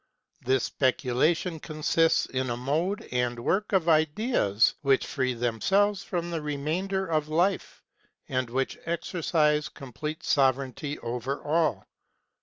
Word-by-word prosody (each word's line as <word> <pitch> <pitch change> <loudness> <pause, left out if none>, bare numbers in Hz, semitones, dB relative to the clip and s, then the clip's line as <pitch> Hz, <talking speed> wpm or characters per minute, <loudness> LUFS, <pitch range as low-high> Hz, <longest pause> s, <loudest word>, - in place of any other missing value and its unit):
This 130 0 +2
specula 130 +2 +2
tion 165 -1 -5
consists 155 +1 +1
in 130 -1 -2
a 120 - -2
mode 160 +10 -1
and 125 -1 0
work 190 - 0
of 185 -4 +2
ideas 155 - +2
which 135 -2 +2
free 130 -3 -1
themselves 190 - +1
from 175 -3 -3
the 165 -2 -2
remainder 160 +7 -2
of 155 -3 0
life, 175 +5 0 0.4
and 130 -2 -1
which 130 +2 -2
exercise 155 -3 0
complete 150 +3 -7
sove 135 -3 +4
reignty 140 +2 -6
over 125 +4 -3
all. 155 - +1
150 Hz, 130 wpm, -27 LUFS, 130-170 Hz, 0.4 s, sove